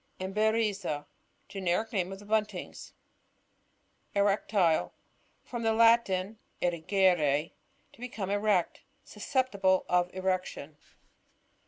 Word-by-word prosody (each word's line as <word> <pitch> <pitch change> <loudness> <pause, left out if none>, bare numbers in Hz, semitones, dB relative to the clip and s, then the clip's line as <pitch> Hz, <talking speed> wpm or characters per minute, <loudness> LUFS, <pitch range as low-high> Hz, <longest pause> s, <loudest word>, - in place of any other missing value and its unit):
Emberiza. 200 -5 0 0.2
— - - -42
Generic 195 +4 -1
name 185 -2 -1
of 195 - -6
the 205 - -14
Buntings. 215 0 -3 1.2
Erectile. 200 -4 +2 0.2
— - - -40
From 240 -2 -5
tfie 225 -1 +1
Latin, 225 -3 +3 0.2
ewers, 170 -4 +1 0.4
to - - -20
become 225 -6 -5
erect 205 -3 +1 0.2
Susceptible 205 -5 0
of 180 0 +1
erection. 185 -5 -3
195 Hz, 100 wpm, -29 LUFS, 180-215 Hz, 1.2 s, Latin